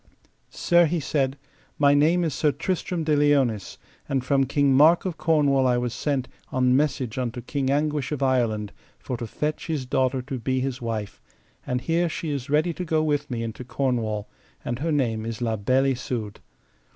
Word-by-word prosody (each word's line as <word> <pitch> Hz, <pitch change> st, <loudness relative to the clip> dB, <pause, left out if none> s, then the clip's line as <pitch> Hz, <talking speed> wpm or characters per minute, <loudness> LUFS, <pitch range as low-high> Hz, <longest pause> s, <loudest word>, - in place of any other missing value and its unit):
Sir, 175 Hz, -1 st, +3 dB
he 170 Hz, +2 st, -1 dB
said, 135 Hz, -2 st, -1 dB, 0.4 s
my 145 Hz, -1 st, +5 dB
name 160 Hz, +5 st, +3 dB
is 160 Hz, -4 st, -1 dB
Sir 150 Hz, +2 st, +2 dB
Tristram 180 Hz, 0 st, -2 dB
de 155 Hz, -1 st, +2 dB
Liones, 140 Hz, -8 st, +1 dB, 0.3 s
and 135 Hz, -2 st, -1 dB
from 135 Hz, +1 st, +2 dB
King 140 Hz, 0 st, +2 dB
Mark 155 Hz, +7 st, +5 dB
of 180 Hz, -3 st, -2 dB
Cornwall 140 Hz, -5 st, +3 dB
I 125 Hz, -1 st, +3 dB
was 120 Hz, -1 st, -2 dB
sent 140 Hz, -4 st, -1 dB, 0.2 s
on 125 Hz, -1 st, +3 dB
message 135 Hz, -4 st, 0 dB
unto 125 Hz, -1 st, -3 dB
King 135 Hz, +2 st, -2 dB
Anguish 145 Hz, 0 st, 0 dB
of 145 Hz, -2 st, -2 dB
Ireland, 115 Hz, -6 st, +1 dB, 0.3 s
for 125 Hz, -, -5 dB
to 115 Hz, -, -5 dB
fetch 150 Hz, +7 st, -3 dB
his 155 Hz, -5 st, -2 dB
daughter 130 Hz, 0 st, 0 dB
to 135 Hz, -1 st, -5 dB
be 130 Hz, +2 st, -1 dB
his 130 Hz, 0 st, -3 dB
wife, 110 Hz, -3 st, -4 dB, 0.5 s
and 125 Hz, 0 st, -1 dB
here 165 Hz, +5 st, +1 dB
she 160 Hz, -1 st, -4 dB
is 140 Hz, -1 st, -4 dB
ready 155 Hz, +4 st, +2 dB
to 180 Hz, -, -5 dB
go 160 Hz, -2 st, +1 dB
with 145 Hz, -1 st, 0 dB
me 120 Hz, -2 st, -3 dB
into 115 Hz, +2 st, -5 dB
Cornwall, 115 Hz, -5 st, -1 dB, 0.4 s
and 120 Hz, 0 st, -3 dB
her 165 Hz, +3 st, -1 dB
name 120 Hz, -7 st, 0 dB
is 115 Hz, -1 st, -5 dB
La 115 Hz, -2 st, 0 dB
Beale 130 Hz, +6 st, +2 dB
Isoud. 120 Hz, -4 st, -5 dB
135 Hz, 190 wpm, -25 LUFS, 125-150 Hz, 0.5 s, my